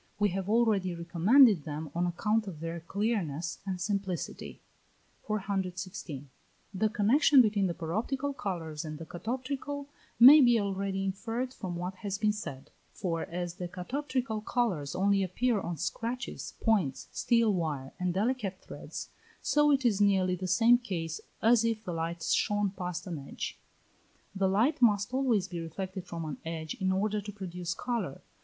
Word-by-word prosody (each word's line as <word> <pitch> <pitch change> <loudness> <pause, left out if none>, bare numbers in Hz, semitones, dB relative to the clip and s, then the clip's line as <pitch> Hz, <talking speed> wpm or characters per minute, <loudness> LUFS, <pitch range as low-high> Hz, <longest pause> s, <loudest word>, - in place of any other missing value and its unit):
We 205 0 +3
have 190 +1 -3
already 210 -6 +2
recommended 180 - +5
them 150 0 -5
on 175 +1 0
account 210 +5 0
of 170 -6 -7
their 165 +1 -4
clearness 175 -4 -2
and 185 -2 -2
simplicity. 195 -2 -3 0.7
416. 185 -8 -3 0.5
The 215 +3 +1
connexion 260 +8 +5
between 205 -5 +4
the 170 - -3
paroptical 240 - -2
colours 170 - -4
and 155 -1 -6
the 165 - -8
catoptrical 265 - -4 0.3
may 280 +6 +11
be 240 -3 +5
already 195 -1 -2
inferred 230 +6 -3
from 185 -8 -5
what 180 +2 -4
has 200 -2 -3
been 210 0 +2
said: 145 -10 -7 0.2
for 170 -4 -2
as 175 0 -5
the 180 - -4
catoptrical 240 +5 -3
colours 185 - -1
only 200 +1 +3
appear 215 +5 +1
on 170 -2 -4
scratches, 230 - -4
points, 195 - +1
steel 230 -3 +2
wire, 150 -7 -2
and 180 -1 0
delicate 205 -3 -1
threads, - - -8 0.3
so 295 0 +4
it 270 -3 +3
is 210 -4 +3
nearly 190 -2 +3
the 185 +1 -4
same 230 +6 +5
case 165 -9 -4 0.2
as 230 0 +5
if 225 -1 0
the 180 - -4
light 165 +1 -3
shone 205 -2 +1
past 180 -3 -5
an 170 -5 -4
edge. 140 - -6 0.7
The 195 -1 +1
light 245 +11 +2
must 210 0 +3
always 245 -8 +2
be 175 -2 -5
reflected 185 +3 -5
from 165 -1 -5
an 150 - -5
edge 160 -1 -4
in 190 0 +1
order 205 +2 0
to 205 +1 -7
produce 180 -4 -5
colour. 230 - -3
195 Hz, 160 wpm, -30 LUFS, 175-225 Hz, 0.7 s, may